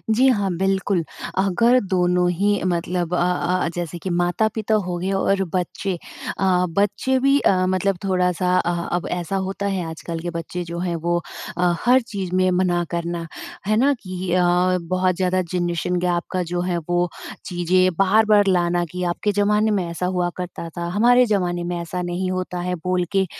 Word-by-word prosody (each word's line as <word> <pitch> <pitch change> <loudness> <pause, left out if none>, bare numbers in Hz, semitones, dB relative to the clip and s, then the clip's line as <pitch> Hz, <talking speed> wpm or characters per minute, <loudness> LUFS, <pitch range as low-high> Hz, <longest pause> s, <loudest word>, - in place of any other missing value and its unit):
जी 260 +4 +5
हाँ। 205 -6 +1
बिल्कुल, 190 -1 +1 0.3
अगर 230 +6 +4
दोनों 180 -1 +2
ही 200 +3 +1
मतलब 175 0 -1
अ - - +2 0.5
अ, - - 0
जैसे 175 -1 -4
कि 190 - -2
माता-पिता 215 +5 0
हो 175 -1 -3
गए 185 +3 -2
और 195 0 +1
बच्चे 185 +2 -2 0.5
अ, 185 -2 +3
बच्चे 205 +8 +1
भी 275 +2 +4
अ, 185 -6 +2
मतलब 185 0 +1
थोड़ा-सा 180 -1 +1
अ, 175 - 0 0.2
अब 175 - -2
ऐसा 180 +2 -2
होता 195 +1 -4
है 190 -3 -1
आजकल 165 +1 -6
के 175 +2 -4
बच्चे 170 +2 -4
जो 170 0 -6
हैं 175 -1 -1
वो 170 +1 0 0.4
अ, 180 -1 +3
हर 255 +2 +5
चीज़ 195 -6 -5
में 185 0 +3
मना 180 -1 +1
करना, 170 0 -3 0.4
है 215 - +3
ना? 275 +5 +4
कि 185 -1 -5
अ, 180 - +3 0.4
बहुत 185 +1 0
ज़्यादा 185 0 +1
ज़नरेशन 175 0 -1
गैप 175 -1 0
का 185 -1 0
जो 175 0 0
है 180 -1 -1
वो 175 0 +1 0.4
चीज़ें 180 +1 +2
बार-बार 205 +1 +4
लाना 175 -1 +2
कि 180 0 -4
आपके 175 +4 0
ज़माने 210 +2 +2
में 195 -3 +1
ऐसा 170 +2 -3
हुआ 180 -1 0
करता 175 -2 -6
था, 170 - -2
हमारे 245 +4 +5
ज़माने 180 -5 0
में 175 0 -3
ऐसा 170 +2 -4
नहीं 180 +1 -2
होता 185 -1 -3
है 180 - 0
बोल 180 +1 -1
के 195 0 +4
180 Hz, 180 wpm, -22 LUFS, 175-195 Hz, 0.5 s, जी